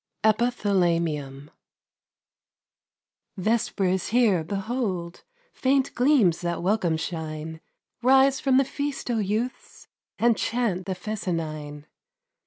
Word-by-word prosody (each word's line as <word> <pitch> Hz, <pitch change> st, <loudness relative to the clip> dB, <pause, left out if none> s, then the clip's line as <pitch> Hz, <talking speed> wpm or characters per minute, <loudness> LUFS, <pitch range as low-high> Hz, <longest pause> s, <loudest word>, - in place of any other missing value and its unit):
EPITHALAMIUM 170 Hz, -, 0 dB, 1.9 s
Vesper 215 Hz, +1 st, 0 dB
is 185 Hz, 0 st, 0 dB
here! 215 Hz, -7 st, +3 dB
behold 195 Hz, -2 st, -3 dB, 0.3 s
Faint 270 Hz, +1 st, +1 dB
gleams 245 Hz, -, +3 dB
that 170 Hz, -1 st, -2 dB
welcome 180 Hz, -4 st, +1 dB
shine! 160 Hz, -1 st, -5 dB, 0.4 s
Rise 265 Hz, +2 st, +5 dB
from 265 Hz, -2 st, +3 dB
the 270 Hz, -, +4 dB
feast, 280 Hz, -1 st, -4 dB
O 230 Hz, -, 0 dB
youths, 215 Hz, +5 st, -3 dB, 0.3 s
And 235 Hz, 0 st, +3 dB
chant 215 Hz, -7 st, -1 dB
the 190 Hz, -, -2 dB
fescennine! 155 Hz, -8 st, -4 dB
195 Hz, 95 wpm, -25 LUFS, 170-240 Hz, 1.9 s, Rise